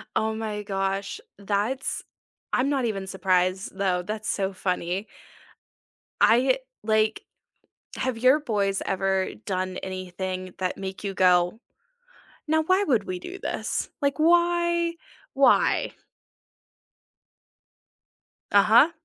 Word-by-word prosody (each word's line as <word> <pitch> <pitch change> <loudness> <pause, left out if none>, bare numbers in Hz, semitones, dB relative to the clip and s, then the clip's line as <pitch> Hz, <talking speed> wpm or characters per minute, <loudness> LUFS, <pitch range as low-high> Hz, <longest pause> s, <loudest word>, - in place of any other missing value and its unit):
Oh 220 0 +1
my 215 -2 -4
gosh, 195 0 -2 0.2
that's 210 +6 -2 0.5
I'm 255 +2 +2
not 275 -3 +1
even 195 -4 -3
surprised 185 0 0
though, 185 -2 +1
that's 215 +3 -4
so 195 -1 -1
funny. 185 +2 -2 1.1
I 260 - +5 0.2
like, 215 0 +2 0.8
have 255 -3 -2
your 260 +5 +5
boys 200 -7 0
ever 190 0 0 0.2
done 185 -1 -2
anything 185 0 -5
that 185 -1 -2
make 190 0 -6
you 195 -1 -3
go, 180 +3 +3 0.9
"Now 315 0 +3
why 375 +4 +3
would 235 - +2
we 185 -1 -4
do 370 - -8
this? - - -3
Like 280 +2 +1
why? 345 +1 +3 0.4
Why?" 270 -2 +3 2.6
Uh-huh. 220 +10 +6
200 Hz, 105 wpm, -25 LUFS, 190-255 Hz, 2.6 s, Uh-huh